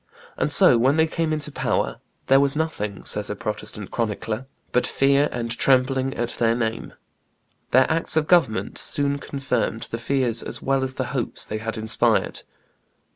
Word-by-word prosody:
And -, -, -1 dB
so, 120 Hz, -, +5 dB
when 135 Hz, +6 st, +3 dB
they 160 Hz, -, +5 dB
came 160 Hz, 0 st, -2 dB
into 150 Hz, -1 st, -2 dB
power, -, -, -1 dB, 0.2 s
"there 135 Hz, +1 st, +5 dB
was 140 Hz, 0 st, +4 dB
nothing," 105 Hz, -11 st, -3 dB
says 105 Hz, 0 st, -1 dB
a 105 Hz, -, -3 dB
Protestant 105 Hz, -1 st, -5 dB
chronicler, 115 Hz, +2 st, -3 dB, 0.2 s
"but 125 Hz, -, +2 dB
fear 140 Hz, +2 st, +3 dB
and 115 Hz, -1 st, -3 dB
trembling 130 Hz, +1 st, +2 dB
at 120 Hz, 0 st, -2 dB
their 115 Hz, -1 st, +1 dB
name." 115 Hz, -1 st, -3 dB, 0.8 s
Their 130 Hz, +1 st, +5 dB
acts 160 Hz, 0 st, +1 dB
of 155 Hz, -, +3 dB
government 155 Hz, -11 st, +2 dB
soon 140 Hz, 0 st, 0 dB
confirmed 140 Hz, -5 st, -2 dB
the 115 Hz, -, -3 dB
fears 120 Hz, -2 st, 0 dB
as -, -, -4 dB
well 135 Hz, 0 st, 0 dB
as 130 Hz, 0 st, -3 dB
the 130 Hz, -, -1 dB
hopes 125 Hz, -4 st, -2 dB
they 110 Hz, -, -4 dB
had 115 Hz, 0 st, -4 dB
inspired. 110 Hz, 0 st, +1 dB
130 Hz, 170 wpm, -23 LUFS, 115-140 Hz, 0.8 s, so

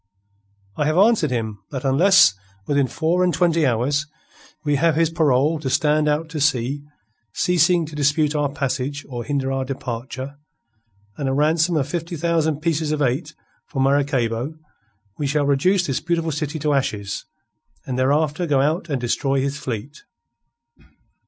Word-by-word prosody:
"I 150 Hz, -, +1 dB
have 155 Hz, +2 st, +1 dB
answered 200 Hz, -6 st, +4 dB
him 110 Hz, -4 st, -3 dB
that 135 Hz, -1 st, -5 dB
unless 165 Hz, -, +5 dB, 0.3 s
within 140 Hz, 0 st, +1 dB
four 170 Hz, +7 st, 0 dB
and 180 Hz, -, +3 dB
twenty 165 Hz, -4 st, +2 dB
hours 135 Hz, +5 st, 0 dB, 0.6 s
we 145 Hz, -1 st, +2 dB
have 165 Hz, +1 st, +2 dB
his 165 Hz, 0 st, +2 dB
parole 155 Hz, -1 st, +2 dB
to 140 Hz, -3 st, -3 dB
stand 150 Hz, +2 st, +2 dB
out 150 Hz, +2 st, 0 dB
to 155 Hz, -2 st, -4 dB
sea, 135 Hz, 0 st, +1 dB, 0.5 s
ceasing 175 Hz, -1 st, +2 dB
to 155 Hz, 0 st, -10 dB
dispute 150 Hz, +1 st, +2 dB
our 145 Hz, -2 st, 0 dB
passage 140 Hz, 0 st, -3 dB
or 120 Hz, -3 st, -5 dB
hinder 135 Hz, +1 st, -1 dB
our 135 Hz, 0 st, -1 dB
departure, 130 Hz, +1 st, -6 dB, 0.8 s
and 140 Hz, -2 st, -2 dB
a -, -, 0 dB
ransom 160 Hz, +4 st, +2 dB
of 140 Hz, -2 st, 0 dB
fifty 170 Hz, +2 st, -4 dB
thousand 160 Hz, -2 st, 0 dB
pieces 160 Hz, -2 st, 0 dB
of 155 Hz, -, -1 dB
eight 145 Hz, +3 st, -1 dB, 0.3 s
for 135 Hz, -, -5 dB
Maracaybo, 135 Hz, -1 st, +1 dB, 0.6 s
we 145 Hz, -, 0 dB
shall 145 Hz, +1 st, +1 dB
reduce 175 Hz, +7 st, +2 dB
this 135 Hz, -4 st, -1 dB
beautiful 165 Hz, -1 st, -1 dB
city 150 Hz, +1 st, -3 dB
to 150 Hz, -1 st, 0 dB
ashes, 105 Hz, -7 st, -2 dB, 0.6 s
and 130 Hz, -, -3 dB
thereafter 150 Hz, +5 st, +1 dB
go 145 Hz, -3 st, +2 dB
out 160 Hz, +5 st, 0 dB
and 140 Hz, -3 st, -1 dB
destroy 135 Hz, +3 st, 0 dB
his 140 Hz, +2 st, -2 dB
fleet." 130 Hz, +4 st, -6 dB
145 Hz, 160 wpm, -21 LUFS, 135-160 Hz, 0.8 s, unless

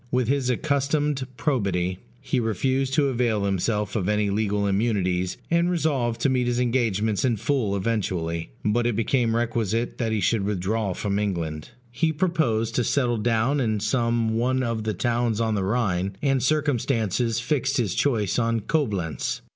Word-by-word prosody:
With 125 Hz, -2 st, +1 dB
his 135 Hz, -2 st, +1 dB
accustomed 140 Hz, +1 st, 0 dB
probity, 95 Hz, -, 0 dB, 0.2 s
he 130 Hz, 0 st, -1 dB
refused 130 Hz, +5 st, 0 dB
to 145 Hz, -3 st, +3 dB
avail 115 Hz, -5 st, 0 dB
himself 105 Hz, +2 st, -1 dB
of 100 Hz, -3 st, 0 dB
any 105 Hz, -1 st, +1 dB
legal 105 Hz, 0 st, 0 dB
immunities, 95 Hz, -3 st, 0 dB
and 170 Hz, +1 st, +3 dB
resolved 140 Hz, -9 st, 0 dB
to 140 Hz, -, +3 dB
meet 125 Hz, -2 st, +1 dB
his 120 Hz, 0 st, 0 dB
engagements 110 Hz, -4 st, +1 dB
in 120 Hz, -4 st, +2 dB
full 115 Hz, -4 st, 0 dB
eventually; 90 Hz, -, -2 dB, 0.2 s
but 115 Hz, +3 st, +2 dB
it 120 Hz, -, 0 dB
became 115 Hz, +1 st, +1 dB
requisite 115 Hz, -1 st, -1 dB
that 115 Hz, -2 st, 0 dB
he 110 Hz, -, 0 dB
should 100 Hz, +2 st, +1 dB
withdraw 100 Hz, +1 st, -1 dB
from 100 Hz, -1 st, -1 dB
England. 85 Hz, -7 st, -3 dB, 0.2 s
He 160 Hz, +6 st, +1 dB
proposed 155 Hz, -10 st, 0 dB
to 125 Hz, -, +3 dB
settle 120 Hz, -1 st, +1 dB
down 115 Hz, +5 st, +1 dB
in 110 Hz, -5 st, 0 dB
some 115 Hz, +1 st, +1 dB
one 130 Hz, +3 st, +1 dB
of 115 Hz, -3 st, -2 dB
the 110 Hz, -2 st, -1 dB
towns 120 Hz, +1 st, 0 dB
on 110 Hz, -1 st, +1 dB
the 100 Hz, -2 st, 0 dB
Rhine, 95 Hz, -3 st, 0 dB
and 135 Hz, -2 st, +1 dB
circumstances 120 Hz, -, +1 dB
fixed 135 Hz, +1 st, 0 dB
his 110 Hz, -8 st, 0 dB
choice 115 Hz, -7 st, +1 dB
on 115 Hz, -1 st, +1 dB
Coblentz. 105 Hz, -, -1 dB
115 Hz, 165 wpm, -24 LUFS, 105-130 Hz, 0.2 s, to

